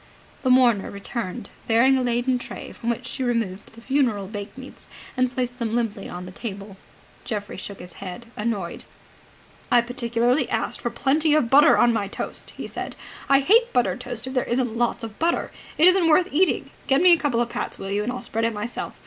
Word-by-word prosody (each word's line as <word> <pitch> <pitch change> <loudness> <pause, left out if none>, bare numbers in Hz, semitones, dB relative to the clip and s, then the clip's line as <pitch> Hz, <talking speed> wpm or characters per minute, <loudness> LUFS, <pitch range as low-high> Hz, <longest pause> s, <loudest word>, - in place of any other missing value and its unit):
The 260 - 0
mourner 245 -5 +4
returned, 200 +1 -5 0.2
bearing 235 +4 +5
a 260 - +1
laden 245 +1 +1
tray, - - -8
from 235 - -5
which 235 - -2
she - - -6
removed 230 -6 -2
the 230 - -14
funeral 250 -8 +1
bakemeats 210 +6 -9 0.3
and 255 -1 +1
placed 250 -1 -3
them 230 -1 -1
limply 220 -4 -2
on 180 +1 -7
the 180 - -9
table. 200 -1 -7 0.5
Geoffrey 205 -3 -4
shook 200 +1 -8
his 180 -1 -10
head, 190 +4 -7
annoyed. 210 -5 -3 0.9
"I 245 - +6
particularly 245 +1 0
asked - - -2
for 240 - -1
plenty 295 +5 +2
of 250 -7 +1
butter 290 +2 +7
on 240 -1 +4
my 205 -3 -1
toast!" - - -5
he - - -5
said. - - -6 0.3
"I 275 0 +6
hate 460 - +4
buttered 250 0 +1
toast 245 -2 -4
if 260 - -6
there 255 - +1
isn't 245 -2 -1
lots 235 0 0
of 220 -2 -8
butter. 335 +1 0 0.3
It 315 - +6
isn't 365 -2 +5
worth 355 +4 +4
eating. 365 +6 +1 0.2
Get 270 0 +4
me 360 0 +6
a - - +5
couple 270 -6 0
of 240 0 0
pats, - - -4
will 195 - -6
you, 205 +1 0
and 225 +4 -2
I'll 250 0 -5
spread 225 -1 -1
it 230 -1 -1
myself. 210 +3 -5
240 Hz, 205 wpm, -24 LUFS, 215-260 Hz, 0.9 s, butter